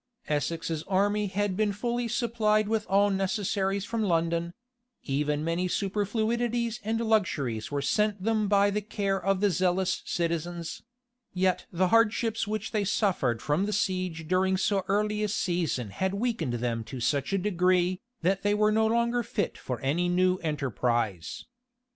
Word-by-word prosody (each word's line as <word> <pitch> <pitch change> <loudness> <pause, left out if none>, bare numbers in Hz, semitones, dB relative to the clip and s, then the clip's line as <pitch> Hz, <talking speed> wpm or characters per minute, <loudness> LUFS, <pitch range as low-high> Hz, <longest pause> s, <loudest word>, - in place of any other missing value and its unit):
Essex's 160 +1 -1
army 205 +2 +1
had 200 0 -1
been 210 +1 +1
fully 235 +3 -2
supplied 225 -3 +1
with 220 -1 -1
all 200 +1 +4
necessaries 195 0 0
from 230 0 -2
London; 170 -2 0 0.5
even 150 +1 -1
many 170 +3 0
superfluities 225 +5 -1
and 225 +2 -1
luxuries 140 - 0
were 145 -1 -2
sent 210 +3 +1
them 215 -1 +1
by 200 0 +4
the 210 +1 -1
care 200 -2 -2
of 195 0 +1
the 205 -1 +3
zealous 185 +2 +1
citizens; 170 0 -3 0.5
yet 185 0 +1
the 185 +1 +1
hardships 230 0 +2
which 215 0 -3
they 215 -2 0
suffered 180 - 0
from 155 +7 +1
the 210 - -2
siege 185 -6 -1
during 190 +2 +2
so 195 0 +1
early 210 +1 +1
a 210 - +1
season 170 - -1
had 190 - -1
weakened 205 - -1
them 115 -1 -2
to 130 +3 -7
such 140 +5 0
a 195 - +2
degree, 180 -1 +1 0.2
that 190 +3 +2
they 205 +1 +2
were 210 0 +3
no 220 +1 +3
longer 235 +2 +1
fit 205 -4 -2
for 125 -2 -5
any 165 +7 +1
new 185 +1 +3
enterprise. 120 - -2
190 Hz, 155 wpm, -28 LUFS, 170-210 Hz, 0.5 s, all